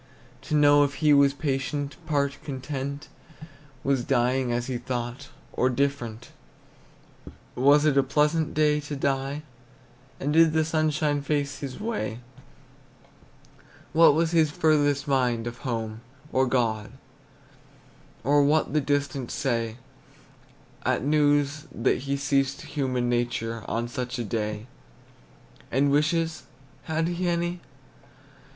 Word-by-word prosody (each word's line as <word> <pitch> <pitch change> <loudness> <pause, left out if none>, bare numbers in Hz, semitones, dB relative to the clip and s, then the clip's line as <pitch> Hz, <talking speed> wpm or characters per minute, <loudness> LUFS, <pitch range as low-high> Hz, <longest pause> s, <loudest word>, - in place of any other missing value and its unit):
To 155 - +1
know 145 -1 +6
if 140 -1 -1
he 150 -1 +3
was 140 -1 +5
patient, 140 0 -2
part 140 -3 0
content, 140 +1 -5 0.8
Was 135 -3 +1
dying 125 0 +1
as 120 0 -1
he 125 -1 -3
thought, 125 +2 -5 0.2
or 130 - +2
different; 125 -4 -2 1.2
Was 145 +4 +4
it 140 -2 +4
a - - +6
pleasant 150 +4 +1
day 150 -1 +3
to 150 0 -6
die, 140 +1 -1 0.8
And 145 +2 -1
did 165 0 +5
the 160 0 +2
sunshine 155 -2 0
face 145 -1 -2
his 135 -3 -6
way? 210 - -3 1.7
What 165 -2 +6
was 165 0 +1
his 160 -3 +3
furthest 145 -2 +2
mind, 125 -4 +1
of 120 +1 -6
home, 115 -4 -4 0.3
or 130 0 +2
God, 115 -4 0 1.3
Or 145 +3 +4
what 150 +2 +2
the 155 - +3
distant 140 -2 -1
say 115 -5 -2 1.1
At - - 0
news 145 0 +2
that 115 - +1
he 140 - +1
ceased 140 -1 0
human 130 -4 -1
nature 120 -2 -1
On 115 +1 -2
such 125 0 -4
a 120 - -2
day? 105 0 -3 1.1
And 140 +2 +2
wishes, 160 +3 +1 0.4
had 160 +1 0
he 175 +1 -2
any? 175 +1 -1
140 Hz, 125 wpm, -26 LUFS, 125-150 Hz, 1.7 s, know